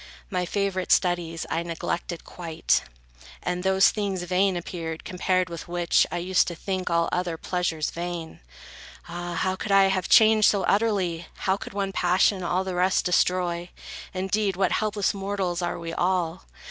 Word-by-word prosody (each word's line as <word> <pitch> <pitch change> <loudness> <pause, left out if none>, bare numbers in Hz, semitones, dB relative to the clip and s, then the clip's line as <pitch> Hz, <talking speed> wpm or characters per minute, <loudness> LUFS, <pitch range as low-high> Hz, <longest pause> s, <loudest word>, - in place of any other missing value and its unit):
My 180 -2 -1
favorite 195 -2 -1
studies 175 -3 +1
I 165 - -1
neglected 170 0 -4
quite; 165 -2 0 0.6
And 180 0 -2
those 190 +1 +4
things 200 -4 -2
vain 185 +1 +1
appeared, 165 -2 -5
compared 185 0 0
with 170 -1 -7
which, 175 0 +2
I - - -2
used 180 +1 +2
to 170 - -4
think 185 +1 -3
all 170 0 +2
other 180 -2 -1
pleasures 170 -3 -2
vain. 170 -1 -5 0.7
Ah! 175 0 -5
how 185 +3 0
could 200 - -5
I 195 -1 +6
have 190 -2 -1
changed 220 -1 +6
so 200 -2 +1
utterly? 195 -6 +1 0.2
How 190 - +3
could 200 - -8
one 195 -1 -1
passion 185 +2 +2
all 180 +2 0
the 190 -1 -4
rest 180 +1 +2
destroy? 180 -1 +1 0.4
Indeed, 195 +1 0
what 190 -1 +1
helpless 210 -2 0
mortals 195 -3 -2
are 175 - -2
we 165 0 -6
all! 180 -1 -1
180 Hz, 160 wpm, -25 LUFS, 175-195 Hz, 0.7 s, I